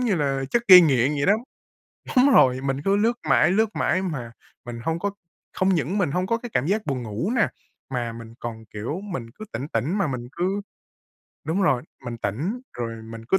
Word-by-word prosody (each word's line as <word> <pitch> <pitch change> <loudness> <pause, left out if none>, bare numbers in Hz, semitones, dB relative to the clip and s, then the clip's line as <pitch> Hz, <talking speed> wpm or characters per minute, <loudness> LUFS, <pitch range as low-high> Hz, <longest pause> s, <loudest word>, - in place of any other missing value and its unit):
như 235 -6 +2
là 135 -4 0
chất 235 - +2
gây 180 -1 +12
nghiện 135 -4 +3
vậy 145 +1 -1
đó. 200 - +6 0.8
Đúng 270 +3 +6
rồi, 130 -5 +5
mình 135 +1 -2
cứ 195 +1 +3
lướt 225 +3 +3 0.2
mãi, 155 - +5
lướt 220 +1 +1
mãi 185 - +1
mà 130 -10 -4 0.3
mình 120 -1 -7
hông 165 +1 0
có 200 +3 -1 0.5
hông 185 - +2
những 165 +6 0
mình 170 -8 +1
hông 180 +1 0
có 230 +2 0
cái 240 0 -8
cảm 125 +4 +1
giác 210 +3 0
buồn 130 -4 -2
ngủ 115 - -3
nè, 230 - +3 0.4
mà 120 -3 -2
mình 115 0 -10
còn, 115 -1 -6
kiểu, 115 - -4
mình 130 - -5
cứ 215 - -10
tỉnh 140 +3 -4
tỉnh 160 +6 -1
mà 195 - +2
mình 125 -3 -4
cứ 185 +4 -1 0.8
đúng 180 +5 0
rồi, 125 -9 +2 0.2
mình 120 -1 -5
tỉnh 150 - -2 0.2
rồi 115 -2 -4
mình 115 0 -9
cứ 190 - +4
145 Hz, 215 wpm, -24 LUFS, 120-195 Hz, 0.8 s, gây